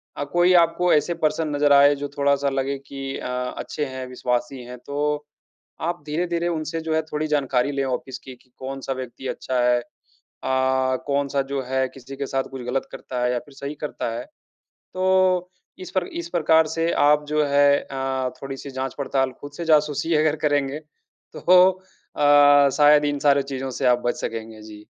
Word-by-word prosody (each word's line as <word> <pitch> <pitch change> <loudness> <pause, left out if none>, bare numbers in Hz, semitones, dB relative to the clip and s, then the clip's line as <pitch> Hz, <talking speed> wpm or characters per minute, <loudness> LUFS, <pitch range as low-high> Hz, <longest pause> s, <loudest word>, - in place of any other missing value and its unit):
अ, - - -3
कोई 175 +1 +4
आपको 170 +1 +1
ऐसे 155 +3 +2
पर्सन 155 +1 +1
नज़र 145 0 +4
आएँ, 140 +1 +7
जो 145 0 -4
थोड़ा-सा 140 0 +2
लगे 135 +1 -2
कि 135 -1 -5
अ, - - -6 0.3
अच्छे 150 - -3
हैं, 130 -1 -6
विश्वासी 125 0 -2
हैं, 125 +1 -9
तो 145 +3 -2 0.6
आप 170 -1 -3
धीरे-धीरे 170 +2 -1
उनसे, 165 0 -3
जो 160 0 -2
है, 160 - +2
थोड़ी 155 0 -3
जानकारी 140 -3 +1
लें 140 -1 -1
ऑफ़िस 130 0 -4
की, 130 - -11
कि 125 +1 -29
कौन-सा 135 0 -5
व्यक्ति 130 0 -7
अच्छा 130 -1 -2
है? 125 0 +3
अ, - - -9 1.2
कौन-सा, 140 -1 0
जो 140 -1 -1
है, 130 +1 0
किसी 135 +1 -10
के 140 0 -3
साथ 135 0 -1
कुछ 135 -1 -7
गलत 130 +2 -2
करता 125 -1 -5
है, 125 - +1
या 125 - 0
फिर 140 - -17
सही 140 +2 -6
करता 145 - -3
है? 120 - -6 0.5
तो 185 -1 +1 0.3
इस 185 - -8
पर 185 -2 0 0.2
इस 170 - -8
प्रकार 160 -2 +3
से 165 +1 -1
आप, 150 +1 +3
जो 150 0 +2
है 140 0 +4
अ, 135 -1 -3
थोड़ी-सी 135 +1 -6
जाँच-पड़ताल, 135 0 -2
खुद 145 0 -9
से 170 - -4
जासूसी 155 +1 +2
अगर 155 0 +2
करेंगे, 145 0 0 0.6
तो - - -7 0.8
अ, 145 -1 +6
शायद 150 0 +6
इन 145 0 -1
सारे 140 -1 +4
चीज़ों 135 -1 -5
से 135 - +1
आप 125 -1 +4
बच 120 - 0
सकेंगे। 110 -1 -5
जी। 105 -1 -12
140 Hz, 180 wpm, -23 LUFS, 130-150 Hz, 1.2 s, आएँ